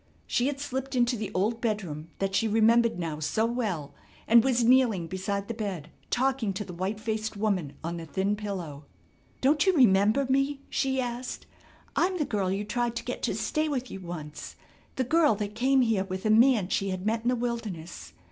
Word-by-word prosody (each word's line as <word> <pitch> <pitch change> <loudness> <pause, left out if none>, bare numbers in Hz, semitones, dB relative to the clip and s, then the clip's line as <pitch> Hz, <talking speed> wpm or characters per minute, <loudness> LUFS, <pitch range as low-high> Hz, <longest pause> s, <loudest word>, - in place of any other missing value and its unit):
She 245 - +1
had 280 -1 -2
slipped 265 -1 -4
into 245 0 +2
the 215 -3 -4
old 215 +5 0
bedroom 180 -9 -3
that 195 0 -1
she 225 +3 +2
remembered 225 +1 +4
now 165 -3 -3
so 185 +9 0
well 215 - -2 0.3
and 230 0 +7
was 245 -2 +2
kneeling 235 -7 +4
beside 195 +3 -3
the 230 - -3
bed 190 -8 -5 0.2
talking 255 -5 +1
to 200 +2 -4
the 180 - -8
white 190 +5 -3
faced 220 -1 -3
woman 195 -9 -1
on 170 +1 -3
the 165 -1 -7
thin 195 +4 0
pillow: 180 -9 -6 0.6
"Don't 295 +6 +3
you 380 - +5
remember 215 - +4
me," 275 +2 +1
she 265 -1 0
asked, 245 0 -4 0.5
"I'm 365 +1 +2
the 300 - 0
girl 195 -6 -1
you 200 +2 -2
tried 240 +2 -1
to - - -4
get - - -4
to - - -1
stay 310 0 -1
with 260 -3 -3
you 195 - -6
once. 160 -4 -7 0.4
The 260 - 0
girl 300 -1 +3
that 205 0 -4
came 260 +4 +3
here 220 -5 +1
with 190 +1 -5
a 215 - +3
man 225 -4 +5
she 195 0 0
had 185 0 -4
met 225 +1 +1
in 235 - -4
the 250 - +2
wilderness. 200 - -5
220 Hz, 200 wpm, -28 LUFS, 190-250 Hz, 0.6 s, and